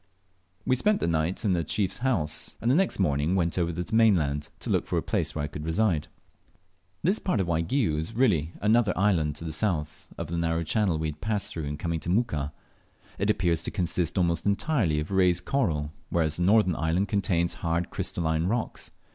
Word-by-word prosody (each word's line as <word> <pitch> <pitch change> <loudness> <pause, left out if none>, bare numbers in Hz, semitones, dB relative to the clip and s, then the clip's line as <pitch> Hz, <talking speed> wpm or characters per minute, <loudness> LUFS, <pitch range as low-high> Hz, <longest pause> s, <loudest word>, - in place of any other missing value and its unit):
We 130 - +3
spent 210 - +2
the - - -1
night 85 +6 -1
in 100 - +3
the 85 -2 +1
chief's 95 +4 -1
house, 105 - -1
and 115 - +1
the - - +4
next 190 +3 +2
morning 75 -1 +1
went 85 -3 +1
over 85 -1 +1
to 85 +2 -3
the 110 +4 -3
mainland 80 -10 +3
to - - -3
look - - +1
out - - -24
for - - -1
a - - 0
place - - -1
where 75 - -2
I - - -1
could 75 0 -7
reside. 80 -1 +1 1.0
This 190 +7 +2
part 180 - 0
of 95 - +1
Waigiou 85 - +1
is 80 +9 -5
really 90 - +2
another 110 0 +3
island 85 -7 +2
to 80 - -6
the 80 - -3
south 75 -3 -2
of - - -3
the 85 0 -3
narrow 85 0 0
channel 95 0 +1
we 80 0 -1
had 75 0 -9
passed 105 -1 -1
through 80 -3 -4
in 75 +1 -4
coming 85 0 -2
to 85 - -6
Muka. 80 - 0 0.7
It 100 +3 0
appears 85 -6 +2
to - - -3
consist 90 -2 -1
almost 85 -2 +1
entirely 100 - +1
of 75 +5 -5
raised 90 -2 +3
coral, 80 - 0 0.2
whereas 80 -2 +1
the - - -3
northern 95 -1 +4
island 85 +5 0
contains 90 -4 +1
hard 85 +1 -1
crystalline 80 -1 -1
rocks. 115 +3 -3
85 Hz, 210 wpm, -27 LUFS, 80-105 Hz, 1.0 s, the